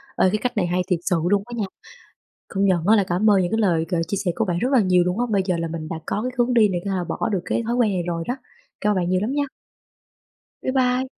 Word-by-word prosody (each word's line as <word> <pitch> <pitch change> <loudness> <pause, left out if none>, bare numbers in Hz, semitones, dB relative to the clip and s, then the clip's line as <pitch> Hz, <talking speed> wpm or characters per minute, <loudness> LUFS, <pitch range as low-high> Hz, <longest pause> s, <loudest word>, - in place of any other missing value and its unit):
Ê, 185 - +4
cái 215 - 0
cách 245 +1 -3
này 180 -3 +2
hay 180 +1 0
thiệt 180 -4 +1
sự 180 - +1
luôn 200 -1 +2
á 240 - -10
nha. 210 - 0 0.8
Công 195 0 0
nhận 180 -3 +2
á 220 - +6
là 205 - +4
cảm 190 +4 +1
ơn 195 -2 +5
những 175 - -1
cái 225 - +1
lời 170 -6 +2
gợi 170 -2 0
chia 200 - -2
sẻ 175 - +2
của 225 - 0
bạn 175 -2 -1
rất 255 +3 0
là 260 - +5
nhiều 185 -3 +4
luôn 180 +5 -1
á, 245 - +2
bây 200 -2 +3
giờ 180 -3 +1
là 165 0 -2
mình 160 -1 -5
đã 160 - -5
có 210 - -2
cái 255 - -2
hướng 245 +1 +2
đi 220 -4 +5
này 175 -2 -2
có 200 - -1
thể - - 0
là 180 - -1
bỏ 175 - -2
được 190 -3 0
cái 235 - -1
thói 235 +2 -1
quen 235 -4 +2
này 180 - -1
rồi 165 -1 -2
đó, 245 - -1 0.5
cảm 210 - +2
ơn - - +1
bạn 180 -1 0
nhiều 185 0 +2
lắm 225 +5 -1
nha. 285 0 0 1.2
Bye 260 - -1
bye. 255 0 +2
195 Hz, 310 wpm, -22 LUFS, 180-230 Hz, 1.2 s, á